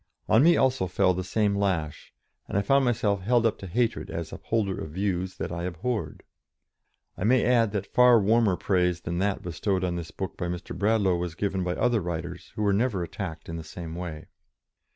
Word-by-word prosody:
On 110 - +5
me 170 +4 +6
also 130 -8 +2
fell 90 +1 +2
the 90 +1 -3
same 100 +2 +1
lash, 90 -7 -2 0.4
and - - -2
I 100 - +2
found 135 +6 +3
myself 105 -5 +1
held 120 +4 +2
up 115 - +1
to 95 - -7
hatred 115 +3 -1
as 85 -1 -5
upholder 105 -4 -2
of 80 - -7
views 95 +1 -2
that - - -4
I 85 0 -3
abhorred. 90 - -3 0.9
I - - -5
may 125 +4 +4
add 115 -3 +3
that 100 -1 -4
far 125 -1 +7
warmer 105 -2 +3
praise 90 -3 +1
than 85 +1 -3
that 100 +1 0
bestowed 90 +2 -1
on 90 -1 -1
this 85 -2 -6
book 95 - -6
by 90 - -2
Mr. 90 0 -5
Bradlaugh 100 -1 +2
was 85 -2 -4
given 95 0 -1
by 90 0 -1
other 120 -3 +2
writers, 85 0 -5
who 105 - -2
were 100 -1 +3
never 105 -3 +1
attacked 80 -2 -6
in 85 - -5
the 80 - -6
same 80 +1 -8
way. 85 -3 -6
95 Hz, 205 wpm, -27 LUFS, 85-110 Hz, 0.9 s, far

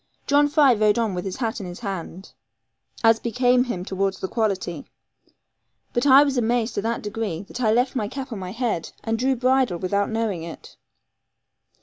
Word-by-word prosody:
John 290 +1 +4
Fry 290 -3 +5
rode 215 0 +2
on 225 -4 0
with 180 +1 -4
his 190 - -4
hat 230 -2 -2
in 195 - -6
his 175 +5 -9
hand, 190 -2 -6 0.7
as 225 0 +5
became 245 +2 +2
him 185 -8 -4
towards 195 0 -1
the 190 - -3
quality; 190 -8 -2 1.1
but 240 +4 +1
I 275 +1 +8
was 275 -3 0
amazed 235 0 0
to - - -2
that 230 +2 -2
degree, 205 -4 -4
that 235 +5 -8
I 220 -3 +3
left 245 +4 +1
my 215 -5 -1
cap 265 +3 -6
on 220 - -5
my 185 -1 -6
head, 225 -7 -2
and 225 0 -1
drew 265 +2 +2
bridle 255 -6 +2
without 200 +3 0
knowing 220 -6 -2
it. 165 0 -10
225 Hz, 190 wpm, -23 LUFS, 195-250 Hz, 1.1 s, I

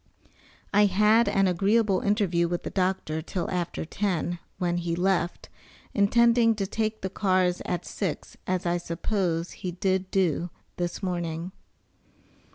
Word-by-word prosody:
I 205 +1 +6
had 210 +3 +4
an 195 -1 +3
agreeable 195 +2 +2
interview 195 -5 +1
with 175 0 -3
the - - -5
doctor 180 -4 -1
till 175 +2 -3
after 175 -3 -2
ten, 175 -1 -1 0.2
when 175 -2 0
he 170 -1 -1
left, 175 -1 0 0.5
intending 230 +2 +4
to 200 -2 -1
take 220 +2 -2
the 190 - -2
cars 185 -3 +1
at 175 - -2
six, 185 -7 -4
as 185 -1 -1
I 175 0 +1
suppose 170 0 -2
he 180 -2 -5
did 190 0 0
do, 180 -3 +1 0.3
this 175 +2 -3
morning. 175 -1 -3
185 Hz, 140 wpm, -27 LUFS, 175-200 Hz, 0.5 s, I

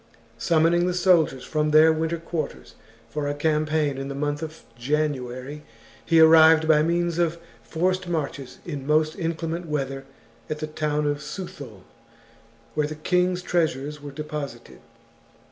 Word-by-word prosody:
Summoning 170 +1 +3
the 180 - -1
soldiers 165 -8 +3
from 155 -1 -1
their 155 +1 +6
winter 160 +1 -1
quarters 165 -2 -5 0.3
for 145 +5 -3
a 145 - -2
campaign 155 -1 0
in 135 - -4
the 140 - -5
month 145 +1 -2
of 160 0 -7
January, 135 +1 -2 0.4
he 165 -1 +3
arrived 160 0 +7
by 155 -1 +5
means 170 +1 0
of 170 -1 +1 0.2
forced 185 +2 -1
marches 145 -5 -4
in 145 -5 -6
most 155 +1 +2
inclement 165 -1 -3
weather 135 -3 -3 0.4
at 155 - -2
the 155 - -4
town 150 -1 -2
of 145 0 0
Suthul, 145 - -8 0.9
where 150 -1 0
the 155 - -6
king's 180 +3 0
treasures 150 -4 -1
were 145 - -7
deposited. 145 -4 -7
155 Hz, 145 wpm, -24 LUFS, 145-165 Hz, 0.9 s, arrived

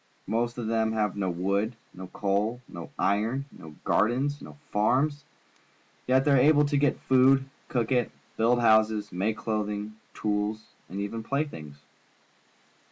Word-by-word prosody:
Most 120 +3 -1
of 120 - -3
them 110 0 +1
have 105 -3 0
no 100 -2 -1
wood, 100 +6 -1 0.2
no 95 0 -8
coal, 105 +6 -1
no 85 -2 -9
iron, 110 +7 0
no 80 -2 -12
gardens, 135 +6 +1
no - - -11
farms, 135 +7 +1 0.8
yet 130 +1 +3
they 145 - +3
are 140 - +6
able 145 +3 +5
to 145 0 -1
get 145 -1 +2
food, 130 +1 +4 0.2
cook 120 -2 -1
it, 125 -2 +2 0.3
build 120 +2 +3
houses, 110 -2 +3
make 100 +4 -1
clothing, 105 -1 -3 0.2
tools, 105 +1 -2 0.2
and 95 +3 -5
even 100 +3 -3
playthings. 80 - -4
110 Hz, 145 wpm, -27 LUFS, 105-130 Hz, 0.8 s, are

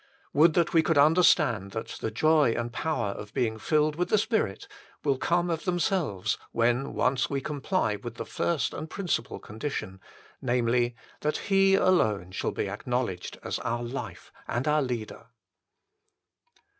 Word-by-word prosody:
Would 155 +3 +5
that 170 -1 +2
we 165 - +6
could 160 -1 +1
understand 145 - +4
that 110 - -4
the - - -1
joy 150 +2 +3
and 120 0 -3
power 125 -6 -1
of 105 +1 -9
being 110 -2 0
filled 150 +3 +1
with 180 - -1
the 215 - +4
Spirit 205 - -1 0.4
will 140 -3 +1
come 175 0 +1
of 165 -1 -2
themselves 175 - 0
when 120 +3 +1
once 130 0 +1
we 140 - -1
comply 140 - -1
with 115 +2 -8
the - - -5
first 160 -7 -1
and 155 - -6
principal 180 - -2
condition 105 -5 -5 0.4
namely, 120 -1 +1 0.2
that 150 0 -1
He 195 0 +3
alone 110 - +2
shall - - -2
be - - -2
acknowledged 120 -8 -3
as - - -3
our 120 +1 -2
Life 120 -7 -6 0.2
and 120 +5 -2
our 150 0 +3
Leader. 120 -3 -4
130 Hz, 155 wpm, -28 LUFS, 115-160 Hz, 0.4 s, we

